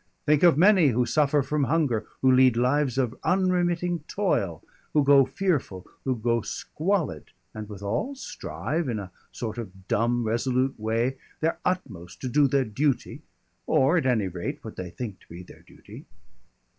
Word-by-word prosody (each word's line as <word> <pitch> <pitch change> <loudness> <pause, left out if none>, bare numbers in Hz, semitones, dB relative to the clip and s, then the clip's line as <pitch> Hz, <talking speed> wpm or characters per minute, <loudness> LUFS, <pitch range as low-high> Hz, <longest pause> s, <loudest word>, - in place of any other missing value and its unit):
"Think 150 -1 +3
of 170 -5 +6
many 185 -2 +6
who 125 -1 +2
suffer 145 +1 +2
from 145 +1 0
hunger, 140 -8 0 0.2
who 130 - +6
lead 130 -2 +5
lives 130 +1 +1
of 125 -3 +1
unremitting 180 -2 +1
toil, 100 - -1 0.3
who 150 - +4
go 140 -1 +6
fearful, 145 - -2 0.2
who 130 -1 +1
go 115 0 0
squalid, 175 - -2 0.3
and 110 -1 -7
withal 105 - -3
strive, 165 - -4
in 115 - -1
a 95 -3 -7 0.2
sort 115 0 -5
of 95 -4 -9
dumb, 120 +3 +1
resolute 125 +3 0
way, 115 +4 0 0.2
their 160 +1 0
utmost 100 - -3
to 130 - -3
do 145 +3 +4
their 135 0 +1
duty, 135 +6 -1 0.5
or 135 +6 +3
at 160 -7 +1
any 110 -6 +2
rate 90 -1 -4
what - - -8
they 90 -1 -6
think 105 0 -7
to - - -25
be 85 +2 -9
their - - -16
duty. - - -14
130 Hz, 165 wpm, -26 LUFS, 110-155 Hz, 0.5 s, of